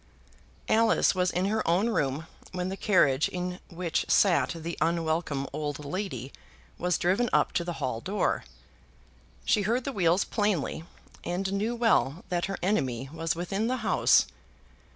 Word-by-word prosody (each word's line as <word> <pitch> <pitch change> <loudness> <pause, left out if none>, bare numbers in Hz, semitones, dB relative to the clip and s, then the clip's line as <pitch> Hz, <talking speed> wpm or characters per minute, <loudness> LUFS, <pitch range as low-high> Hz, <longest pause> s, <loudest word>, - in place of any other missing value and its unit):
Alice 225 +1 +4
was 180 -1 +1
in 180 +1 0
her 215 +2 +1
own 180 +7 +3
room 145 - -1 0.3
when 180 0 -2
the 190 - -3
carriage 155 -9 +3
in 180 0 -4
which 175 -2 -1
sat 190 -4 +4
the 165 +1 -5
unwelcome 160 -4 0
old 150 -1 -4
lady 140 - -4 0.5
was 180 0 +1
driven 200 +6 +1
up - - +3
to 170 - 0
the 175 0 -4
hall 130 -5 -2
door. 200 - 0 1.0
She 210 - +3
heard 235 +5 0
the 275 - -3
wheels 180 -2 +3
plainly, 205 -7 -1 0.4
and 190 +2 -2
knew 215 +4 -1
well 180 - +2
that 175 -1 0
her 195 - -4
enemy 135 - 0
was 165 -1 -1
within 195 +6 -2
the 255 +1 0
house. - - +4
180 Hz, 150 wpm, -28 LUFS, 160-200 Hz, 1.0 s, Alice